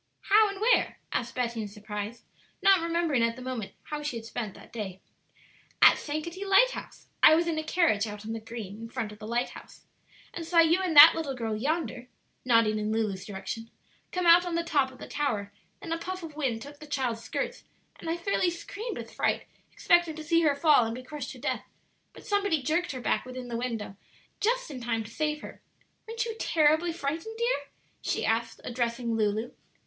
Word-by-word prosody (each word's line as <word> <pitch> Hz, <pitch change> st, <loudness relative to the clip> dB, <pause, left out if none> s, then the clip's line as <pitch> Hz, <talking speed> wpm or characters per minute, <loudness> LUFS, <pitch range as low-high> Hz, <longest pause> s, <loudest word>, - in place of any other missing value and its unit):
"How 425 Hz, +1 st, +5 dB
and 400 Hz, -1 st, -6 dB
where?" 470 Hz, +3 st, +3 dB
asked 240 Hz, 0 st, -2 dB
Betty 235 Hz, -2 st, -1 dB
in 210 Hz, -, -4 dB
surprise, 210 Hz, +2 st, -6 dB, 0.4 s
not 390 Hz, -1 st, +7 dB
remembering 335 Hz, -6 st, +1 dB
at 230 Hz, 0 st, +1 dB
the 255 Hz, -, -10 dB
moment 250 Hz, -6 st, -4 dB
how 300 Hz, 0 st, -5 dB
she 295 Hz, -4 st, -3 dB
had 225 Hz, -1 st, -6 dB
spent 225 Hz, -3 st, -5 dB
that -, -, -15 dB
day. 195 Hz, -5 st, -5 dB, 0.8 s
"At -, -, +7 dB
Sankaty 330 Hz, +5 st, -4 dB
Lighthouse; 400 Hz, +6 st, +2 dB, 0.2 s
I 315 Hz, -, +9 dB
was 335 Hz, +1 st, +1 dB
in 320 Hz, -2 st, 0 dB
a -, -, -3 dB
carriage 310 Hz, -, +2 dB
out 210 Hz, 0 st, -8 dB
on 225 Hz, -, -4 dB
the 225 Hz, -, -4 dB
green 220 Hz, -2 st, -8 dB
in 230 Hz, -, -7 dB
front 230 Hz, -3 st, -4 dB
of 210 Hz, -, -12 dB
the 215 Hz, -, -8 dB
lighthouse, 240 Hz, +2 st, -4 dB, 0.5 s
and 340 Hz, -, -5 dB
saw 335 Hz, +1 st, -2 dB
you 335 Hz, +2 st, +6 dB
and 360 Hz, -4 st, -1 dB
that 300 Hz, +3 st, +12 dB
little 305 Hz, -5 st, -3 dB
girl 225 Hz, -3 st, -2 dB
yonder 260 Hz, 0 st, -2 dB, 0.4 s
(nodding 230 Hz, -3 st, +3 dB
in 210 Hz, 0 st, -1 dB
Lulu's 210 Hz, -4 st, -1 dB
direction) 205 Hz, +3 st, -6 dB, 0.4 s
come 360 Hz, -1 st, -1 dB
out 340 Hz, +1 st, +8 dB
on 350 Hz, -2 st, -3 dB
the 335 Hz, -, +1 dB
top 280 Hz, -5 st, +1 dB
of 260 Hz, -, -15 dB
the -, -, -9 dB
tower; 215 Hz, -9 st, -2 dB, 0.3 s
then 330 Hz, -, -6 dB
a 330 Hz, -, -1 dB
puff 370 Hz, +1 st, -5 dB
of 315 Hz, -3 st, -8 dB
wind 250 Hz, -7 st, -1 dB
took 285 Hz, +1 st, -12 dB
the 305 Hz, -, -11 dB
child's 255 Hz, -5 st, -1 dB
skirts, 225 Hz, -, -4 dB, 0.4 s
and 325 Hz, -, -6 dB
I 330 Hz, -, 0 dB
fairly 365 Hz, 0 st, +1 dB
screamed 415 Hz, +6 st, -6 dB
with -, -, -8 dB
fright, -, -, 0 dB, 0.3 s
expecting 345 Hz, -2 st, +3 dB
to 315 Hz, -, -7 dB
see 335 Hz, +1 st, +3 dB
her 300 Hz, -3 st, +3 dB
fall 295 Hz, -3 st, +5 dB
and 225 Hz, 0 st, -3 dB
be 255 Hz, -, -8 dB
crushed 290 Hz, -1 st, -6 dB
to -, -, -12 dB
death; -, -, -3 dB, 0.4 s
but -, -, -14 dB
somebody 405 Hz, -8 st, +1 dB
jerked 330 Hz, +6 st, 0 dB
her 255 Hz, -, -6 dB
back -, -, +1 dB
within 255 Hz, -1 st, -7 dB
the 235 Hz, -, -3 dB
window 230 Hz, -4 st, -3 dB, 0.4 s
just 475 Hz, -3 st, 0 dB
in 260 Hz, -3 st, -7 dB
time 230 Hz, -1 st, -1 dB
to 215 Hz, -, -11 dB
save 300 Hz, +2 st, -1 dB
her. -, -, -10 dB, 0.5 s
Weren't 460 Hz, +1 st, -2 dB
you 455 Hz, -1 st, -4 dB
terribly 315 Hz, +2 st, +3 dB
frightened, 330 Hz, +8 st, -4 dB
dear?" 470 Hz, -12 st, 0 dB, 0.3 s
she -, -, -1 dB
asked, 225 Hz, +1 st, -1 dB
addressing 235 Hz, -1 st, -2 dB
Lulu. 215 Hz, +2 st, 0 dB
280 Hz, 205 wpm, -28 LUFS, 230-335 Hz, 0.8 s, that